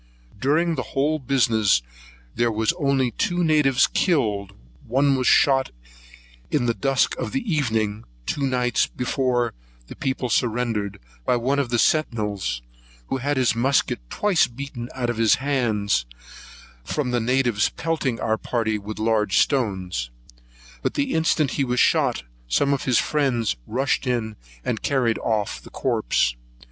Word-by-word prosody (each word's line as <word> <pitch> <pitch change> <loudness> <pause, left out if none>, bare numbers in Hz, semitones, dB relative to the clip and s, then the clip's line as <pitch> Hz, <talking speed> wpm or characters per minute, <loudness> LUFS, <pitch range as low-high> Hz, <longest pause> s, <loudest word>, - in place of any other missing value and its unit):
During 160 +7 +2
the 135 - -2 0.2
whole 150 +3 +2
business 115 - +2 0.5
there 120 -1 +1
was 110 +6 +1
only 135 -4 +1
two 175 - 0
natives 150 -5 +4
killed; 105 - 0 0.3
one 135 +3 +3
was 130 -1 0
shot 135 -1 +4 0.8
in 140 -5 +1
the 120 - +2
dusk 135 +1 +1
of - - -4
the 270 - -1
evening, 110 -7 -1 0.2
two 145 - -2
nights 125 -3 +1
before 125 -1 -1 0.3
the - - -10
people 130 -1 -2
surrendered, 115 -4 -1 0.2
by 125 - +2
one 130 +4 0
of 135 -4 -1
the 120 - +1
centinels, 105 - 0 0.5
who - - 0
had 140 +2 -1
his 130 -2 +3
musket 130 +4 +1
twice 205 -5 +2
beat 140 +4 -7 0.2
out 120 -2 -1
of 120 - -6
his 115 -3 +4
hand 115 - 0 0.8
from 125 - -2
the 120 - +1
natives 120 -3 +2
pelting 150 -7 -2
our 110 0 0
party 110 -3 -1
with 105 +2 -7
large 110 -3 +1
stones; 95 - 0 0.7
but - - -2
the 280 -2 0
instant 160 -3 +2
he - - +4
was 125 -1 0
shot, - - +2 0.2
some 140 - +2
of 140 - -2
his 125 -3 +3
friends 130 -7 +1
rushed 135 +3 0
in 115 -3 -1 0.3
and 110 - -2
carried 125 -5 +1
off 110 -3 -1
the - - -13
corpse. - - 0
125 Hz, 150 wpm, -23 LUFS, 110-140 Hz, 0.8 s, natives